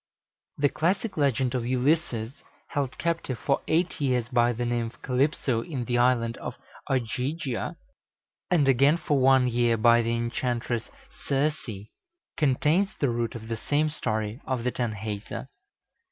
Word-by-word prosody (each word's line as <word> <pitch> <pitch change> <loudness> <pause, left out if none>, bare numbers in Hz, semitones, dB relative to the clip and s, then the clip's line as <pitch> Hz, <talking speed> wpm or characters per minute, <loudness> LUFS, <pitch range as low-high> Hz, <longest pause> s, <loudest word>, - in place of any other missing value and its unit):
The 145 0 +3
classic 195 - 0
legend 135 -4 +1
of 125 -2 -1
Ulysses, 130 -2 +1 0.4
held 140 -3 -2
captive 165 -7 -1
for 140 +5 0
eight 170 0 +1
years 125 -4 +1
by 120 -1 +3
the 120 +1 -2
nymph 120 -1 -2
Calypso 130 -2 +1
in 130 -2 -4
the 120 0 +1
Island 120 -2 +2
of - - -6 0.3
Ogygia, 130 +2 -2 0.7
and 160 -6 +3
again 140 +4 +5
for 150 -4 0
one 130 -1 +5
year 120 -1 +2
by 115 +2 +5
the 115 0 0
enchantress 120 0 -2 0.2
Circe, 145 0 -1 0.7
contains 155 +6 +2
the 140 - +2
root 115 -1 -2
of 110 -1 -7
the 115 0 -3
same 150 +6 +1
story 110 -4 -2
of 130 -3 -1
the 125 - 0
Tanhäuser. 110 -4 -4
125 Hz, 140 wpm, -27 LUFS, 115-145 Hz, 0.7 s, again